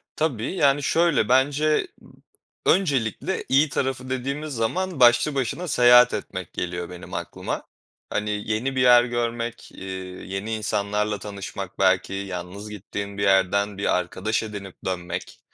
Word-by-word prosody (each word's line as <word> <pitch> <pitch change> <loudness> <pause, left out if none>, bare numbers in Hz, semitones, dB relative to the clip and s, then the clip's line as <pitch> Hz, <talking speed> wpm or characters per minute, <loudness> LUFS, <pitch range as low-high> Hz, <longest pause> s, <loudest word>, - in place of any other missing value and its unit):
Tabii, 140 - -1
yani, 145 -4 +3
şöyle 165 -7 +2
bence, 145 +4 +3
ımm, - - -18 0.5
öncelikle 145 - +1
iyi 145 +4 +4
tarafı 130 -1 -2
dediğimiz 140 +3 -3
zaman 160 +8 -1
başlı 120 +4 +5
başına 135 +7 -2
seyahat 125 -2 +6
etmek 95 -3 -5
geliyor 90 0 -4
benim 90 - -9
aklıma. - - -4 0.5
Hani, 105 0 -1 0.2
yeni 130 +5 -1
bir - - +2
yer 120 -1 +7
görmek, 120 -1 -3
eee, 95 - -10 0.4
yeni 95 +4 -3
insanlarla 105 -1 -1
tanışmak, 100 -2 -7
belki 95 0 +2
yalnız 95 +1 -6
gittiğin 100 0 -6
bir - - -1
yerden 100 +1 +2
bir 100 - +2
arkadaş 95 +6 -2
edinip 100 -3 -7
dönmek, 90 -2 -4
110 Hz, 135 wpm, -24 LUFS, 100-135 Hz, 0.5 s, yer